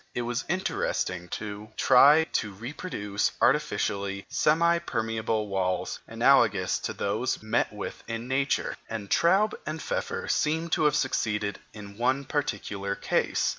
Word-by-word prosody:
It 120 Hz, -, -1 dB
was 120 Hz, +3 st, -2 dB
interesting 95 Hz, -, -1 dB
to 105 Hz, +3 st, -6 dB
try 140 Hz, +5 st, +7 dB
to 105 Hz, -, 0 dB
reproduce 105 Hz, -, -3 dB
artificially 100 Hz, -9 st, 0 dB
semi 170 Hz, +2 st, +3 dB
permeable 115 Hz, -6 st, -2 dB
walls 95 Hz, -2 st, -1 dB
analogous -, -, +3 dB
to -, -, -4 dB
those 110 Hz, +6 st, -1 dB
thus -, -, -16 dB
met 110 Hz, -, +1 dB
with -, -, -7 dB
in 115 Hz, +1 st, -4 dB
nature; 135 Hz, +1 st, 0 dB
and 110 Hz, -3 st, -6 dB
Traube 195 Hz, +6 st, +4 dB
and 155 Hz, +1 st, -4 dB
Pfeffer -, -, -3 dB
seem 160 Hz, +2 st, 0 dB
to 155 Hz, -, +2 dB
have 150 Hz, -1 st, +4 dB
succeeded 105 Hz, -7 st, -1 dB
in 100 Hz, -1 st, -11 dB
one 130 Hz, +3 st, +1 dB
particular 100 Hz, -8 st, -2 dB
case. -, -, 0 dB
115 Hz, 135 wpm, -27 LUFS, 100-150 Hz, -, try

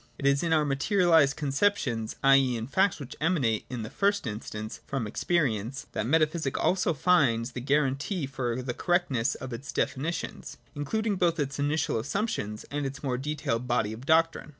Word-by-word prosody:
It 140 Hz, -, -6 dB
is 140 Hz, 0 st, +4 dB
in 170 Hz, -, -1 dB
our 155 Hz, -2 st, +3 dB
materialised 155 Hz, 0 st, +3 dB
conceptions^ 140 Hz, -, 0 dB
i. 135 Hz, 0 st, +7 dB
e. 130 Hz, -3 st, +3 dB
in 115 Hz, -, -4 dB
facts 190 Hz, +8 st, +1 dB
which 140 Hz, -3 st, -8 dB
emanate, 140 Hz, -, +1 dB
in 120 Hz, -3 st, -4 dB
the 110 Hz, -, -6 dB
first 200 Hz, -2 st, +1 dB
instance, 110 Hz, -1 st, -6 dB
from 135 Hz, -4 st, -2 dB
experience, 125 Hz, -, -1 dB
that 110 Hz, -, -2 dB
metaphysic 155 Hz, 0 st, +1 dB
also 185 Hz, -3 st, +1 dB
finds 135 Hz, -8 st, +2 dB
the 125 Hz, -, -6 dB
guarantee 140 Hz, -, 0 dB
for 130 Hz, -2 st, -3 dB
the 125 Hz, -1 st, -3 dB
correctness 140 Hz, -10 st, +1 dB
of 130 Hz, -1 st, -7 dB
its 130 Hz, +4 st, -6 dB
defini 145 Hz, +5 st, -1 dB
tions -, -, -6 dB, 0.2 s
(including 205 Hz, +8 st, -1 dB
both 170 Hz, -3 st, +1 dB
its 140 Hz, -1 st, -2 dB
initial 145 Hz, -4 st, 0 dB
assumptions 130 Hz, -, -3 dB
and 145 Hz, +1 st, -2 dB
its 135 Hz, +2 st, -8 dB
more 125 Hz, -3 st, -1 dB
detailed 135 Hz, -4 st, -2 dB
body 115 Hz, -3 st, 0 dB
of 120 Hz, +5 st, -10 dB
doctrine). 165 Hz, -1 st, +2 dB
140 Hz, 175 wpm, -28 LUFS, 125-165 Hz, 0.2 s, i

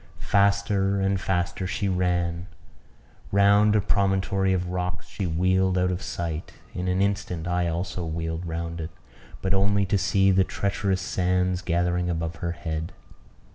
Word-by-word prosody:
Faster 100 Hz, -1 st, +2 dB
and 95 Hz, 0 st, +1 dB
faster 90 Hz, 0 st, -1 dB
she 100 Hz, -, -1 dB
ran; 90 Hz, -1 st, 0 dB, 0.8 s
round 100 Hz, +1 st, +5 dB
a 105 Hz, -, +4 dB
promontory 95 Hz, -1 st, +1 dB
of 90 Hz, -1 st, 0 dB
rocks 90 Hz, -1 st, -3 dB
she 95 Hz, -, -4 dB
wheeled 95 Hz, +3 st, +2 dB
out 90 Hz, 0 st, +2 dB
of 90 Hz, +1 st, -3 dB
sight; 85 Hz, -2 st, -4 dB, 0.2 s
in 90 Hz, +1 st, -3 dB
an 90 Hz, +1 st, +2 dB
instant 95 Hz, -4 st, -2 dB
I 90 Hz, 0 st, +1 dB
also 85 Hz, +1 st, -3 dB
wheeled 80 Hz, +1 st, -3 dB
round 85 Hz, 0 st, -4 dB
it, 80 Hz, -, -5 dB, 0.5 s
but 95 Hz, 0 st, +1 dB
only 100 Hz, +1 st, +2 dB
to 100 Hz, +1 st, +1 dB
see 95 Hz, +2 st, +3 dB
the 95 Hz, 0 st, +4 dB
treacherous 100 Hz, -1 st, -1 dB
sands 90 Hz, 0 st, 0 dB
gathering 90 Hz, 0 st, 0 dB
above 85 Hz, -1 st, -2 dB
her 85 Hz, -1 st, -3 dB
head. 80 Hz, -1 st, -4 dB
90 Hz, 150 wpm, -25 LUFS, 85-95 Hz, 0.8 s, round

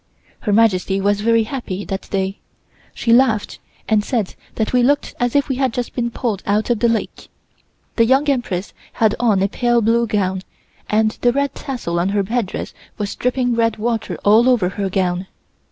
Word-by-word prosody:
Her 210 Hz, -, -2 dB
Majesty 195 Hz, -3 st, +3 dB
was 205 Hz, +1 st, +1 dB
very 230 Hz, +1 st, +3 dB
happy 215 Hz, -5 st, -5 dB
that 195 Hz, -1 st, -5 dB
day. 195 Hz, 0 st, -2 dB, 0.6 s
She 230 Hz, -, +2 dB
laughed 235 Hz, -4 st, +2 dB, 0.3 s
and 215 Hz, -1 st, +2 dB
said 220 Hz, -5 st, -2 dB, 0.2 s
that 220 Hz, +1 st, -1 dB
we 250 Hz, -, +4 dB
looked 285 Hz, +4 st, +1 dB
as 245 Hz, 0 st, 0 dB
if 285 Hz, -, +3 dB
we 265 Hz, -, -2 dB
had 265 Hz, -2 st, +1 dB
just 245 Hz, -1 st, -3 dB
been 235 Hz, -1 st, -1 dB
pulled 225 Hz, -5 st, -3 dB
out 210 Hz, +4 st, +1 dB
of 235 Hz, -, +1 dB
the 235 Hz, -, +3 dB
lake. 230 Hz, -1 st, -3 dB, 0.7 s
The 230 Hz, -, +5 dB
Young 270 Hz, +4 st, +3 dB
Empress 225 Hz, -9 st, -1 dB, 0.2 s
had 220 Hz, -2 st, +2 dB
on 210 Hz, -5 st, +2 dB
a -, -, +3 dB
pale 240 Hz, +3 st, +1 dB
blue 230 Hz, +1 st, +2 dB
gown, 190 Hz, -3 st, 0 dB, 0.5 s
and 215 Hz, 0 st, +2 dB
the 245 Hz, -, +4 dB
red 280 Hz, +1 st, -1 dB
tassel 205 Hz, -11 st, -4 dB
on 180 Hz, +3 st, +1 dB
her 200 Hz, 0 st, +1 dB
headdress 220 Hz, -1 st, -3 dB, 0.2 s
was 205 Hz, -1 st, -3 dB
dripping 250 Hz, 0 st, 0 dB
red 230 Hz, -1 st, +1 dB
water 225 Hz, +1 st, -2 dB
all 220 Hz, +5 st, +6 dB
over 220 Hz, -8 st, +3 dB
her 195 Hz, 0 st, -3 dB
gown. 185 Hz, -1 st, -1 dB
225 Hz, 185 wpm, -19 LUFS, 200-245 Hz, 0.7 s, all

